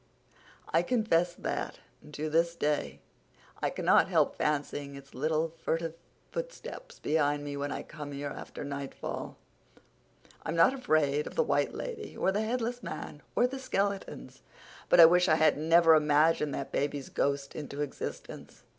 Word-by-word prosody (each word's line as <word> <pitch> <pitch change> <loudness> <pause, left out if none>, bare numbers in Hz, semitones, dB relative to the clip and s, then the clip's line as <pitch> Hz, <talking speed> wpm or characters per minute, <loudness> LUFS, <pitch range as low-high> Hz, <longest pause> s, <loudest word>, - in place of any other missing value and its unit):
I 165 - +3
confess 175 -5 +1
that, - - -3 0.4
to 150 +1 -3
this 165 +2 +2
day, 145 - -1 0.6
I - - +1
cannot - - +3
help - - +2
fancying 145 -1 -2
its 140 0 -13
little, 155 +4 0
furtive 165 0 -1 0.4
footsteps - - -7
behind 145 -1 +1
me 145 -1 -5
when 140 0 -3
I - - -4
come 150 -2 -8
here 140 +1 -4
after - - -8
nightfall. 140 -1 -5 1.0
I'm - - -3
not 165 +10 +5
afraid 155 - +1
of - - -9
the 485 - +3
White - - 0
Lady 450 -3 -6
or 190 - +2
the 205 +2 0
headless 240 +2 -2
man 145 - -7
or - - +4
the 265 +2 -3
skeletons, 200 -6 -3 0.5
but - - +5
I 165 - +12
wish 180 +2 +5
I 155 - +5
had 155 -1 +4
never 165 +2 +5
imagined 150 0 +3
that 140 - -5
baby's 145 -1 -2
ghost 140 0 -1
into 145 -1 -5
existence. 145 -2 -6
155 Hz, 155 wpm, -30 LUFS, 145-180 Hz, 1.0 s, I